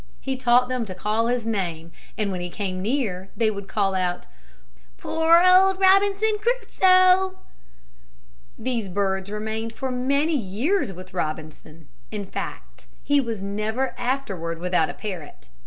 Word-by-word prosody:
He 265 -1 -3
taught 250 -1 +3
them 255 -1 -1
to 185 -3 -7
call 215 +4 0
his 240 -1 -1
name 170 -7 -3 0.3
and 210 -2 -1
when 180 -1 -4
he 175 - -4
came 185 -1 -4
near 200 -5 -2
they 225 -2 +2
would 200 -1 -7
call 195 -2 0
out, 180 -1 -1 0.7
"Poor 325 - +4
old 375 +1 +6
Robinson 395 +3 +4
Crusoe!" 375 -5 +3 1.2
These 235 -3 -2
birds 190 0 -1
remained 220 +2 -4
for 265 +2 -4
many 280 +5 +1
years 240 - 0
with 185 0 -11
Robinson. 155 -1 -6 0.2
In 205 -2 -5
fact, - - -7 0.2
he 285 -1 +3
was 225 -6 -4
never 215 +6 -2
afterward 195 -11 -3
without 180 -2 +1
a - - -6
parrot. 175 - -8
220 Hz, 140 wpm, -24 LUFS, 190-280 Hz, 1.2 s, old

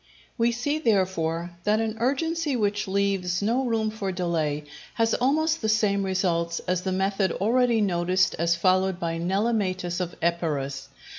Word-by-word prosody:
We 235 -1 +2
see, 285 +6 -1
therefore, 180 - 0
that 210 +2 +2
an 225 -1 -2
urgency 295 +4 0
which 205 -2 0
leaves 195 -2 0
no 240 +5 +1
room 225 -3 0
for 205 -3 -3
delay 165 -5 -1 0.3
has 225 -1 +2
almost 310 +5 +1
the 220 - 0
same 210 -2 +2
results 175 -3 0
as 180 0 0
the 190 - -2
method 195 0 0
already 235 +2 +2
noticed 185 -1 +2
as 170 0 +2
followed 185 +1 +2
by 165 -1 -2
Nelematus 190 -1 0
of 175 -1 -3
Epirus. 140 -5 -2
195 Hz, 150 wpm, -25 LUFS, 175-225 Hz, 0.3 s, We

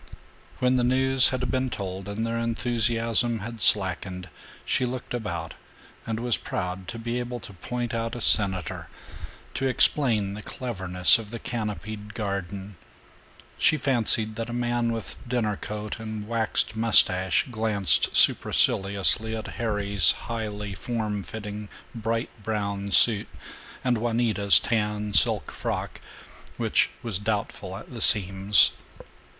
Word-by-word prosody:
When 125 0 +1
the 125 - 0
news 130 +1 +4
had 125 -1 -3
been 130 0 -1
told 95 -2 -6
and 110 +3 -3
their 115 0 -3
enthusiasm 115 0 +2
had 115 +1 -8
slackened 95 -2 +1 0.4
she - - 0
looked 125 0 -5
about 85 -9 -5 0.5
and 110 0 -3
was 120 -1 0
proud 90 0 -6
to 115 - -7
be 120 +2 -4
able 120 0 -6
to 100 - -12
point 120 +5 -5
out 115 0 -3
a 120 - -7
senator, 95 -7 +1 0.7
to 135 - -2
explain 115 -6 +2
the 105 - -8
cleverness 95 -8 +2
of 110 -2 -10
the 115 - -7
canopied 105 -2 -6
garden. 100 -2 -6 0.8
She 155 - +3
fancied 115 -5 +2
that 115 0 -5
a - - -6
man 120 -1 -1
with 115 -2 -7
dinner 115 -4 -1
coat 105 +1 -7
and 110 -1 -7
waxed 110 -1 0
mustache 95 -5 +4
glanced 105 -7 0
superciliously 100 +3 +3
at 110 - -7
Harry's 100 -5 +5
highly 105 -3 -6
form 105 -1 -4
fitting 105 +2 -8 0.2
bright 115 +1 -3
brown 100 -2 -4
suit 105 +3 +4 0.6
and 125 -3 0
Juanita's 115 -4 +4
tan 105 -2 -2
silk - - +3
frock, - - -5 0.6
which - - +1
was 110 -6 -2
doubtful 100 -2 -4
at 110 - -13
the 115 - -7
seams. 100 0 +5
110 Hz, 135 wpm, -25 LUFS, 100-120 Hz, 0.8 s, Harry's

